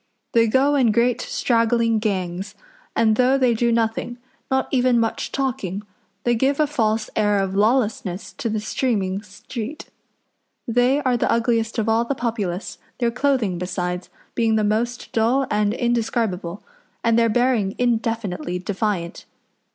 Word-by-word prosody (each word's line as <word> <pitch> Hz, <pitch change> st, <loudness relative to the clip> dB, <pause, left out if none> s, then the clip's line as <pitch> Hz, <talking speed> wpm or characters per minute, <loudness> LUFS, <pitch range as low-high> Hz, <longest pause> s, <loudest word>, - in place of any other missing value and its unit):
They 230 Hz, -1 st, +4 dB
go 265 Hz, +5 st, +3 dB
in 255 Hz, -6 st, +4 dB
great 235 Hz, +2 st, +2 dB
straggling 230 Hz, -1 st, +1 dB
gangs, 190 Hz, -2 st, -3 dB, 0.4 s
and 220 Hz, -1 st, +3 dB
though 255 Hz, +2 st, +4 dB
they 255 Hz, -3 st, +3 dB
do 235 Hz, +1 st, +1 dB
nothing 230 Hz, +1 st, -1 dB, 0.3 s
not 265 Hz, 0 st, +1 dB
even 250 Hz, -2 st, +3 dB
much 225 Hz, -1 st, -1 dB
talking 210 Hz, -8 st, -2 dB, 0.4 s
they 240 Hz, -, +2 dB
give 270 Hz, +5 st, +1 dB
a 305 Hz, -, +5 dB
false 220 Hz, -7 st, 0 dB
air 205 Hz, -1 st, +2 dB
of 195 Hz, -1 st, -1 dB
lawlessness 210 Hz, -4 st, 0 dB
to 240 Hz, -5 st, -1 dB
the 215 Hz, 0 st, -1 dB
streaming 205 Hz, -4 st, -1 dB
street. 225 Hz, +6 st, -8 dB, 0.8 s
They 245 Hz, +4 st, +3 dB
are 255 Hz, -2 st, +2 dB
the -, -, 0 dB
ugliest 230 Hz, -1 st, +1 dB
of 220 Hz, -1 st, 0 dB
all 225 Hz, +1 st, +3 dB
the 275 Hz, +4 st, -2 dB
populace, 215 Hz, -7 st, -3 dB, 0.2 s
their 235 Hz, -2 st, +1 dB
clothing, 250 Hz, -8 st, 0 dB
besides, 180 Hz, 0 st, -3 dB, 0.2 s
being 225 Hz, -2 st, +2 dB
the 215 Hz, -, +2 dB
most 230 Hz, +3 st, -1 dB
dull 240 Hz, +5 st, +2 dB
and 210 Hz, 0 st, +2 dB
indescribable, 225 Hz, -6 st, -1 dB, 0.4 s
and 230 Hz, 0 st, +3 dB
their 230 Hz, 0 st, +3 dB
bearing 235 Hz, -4 st, +1 dB
indefinitely 225 Hz, -7 st, -1 dB
defiant. 185 Hz, -2 st, -3 dB
230 Hz, 145 wpm, -22 LUFS, 205-245 Hz, 0.8 s, a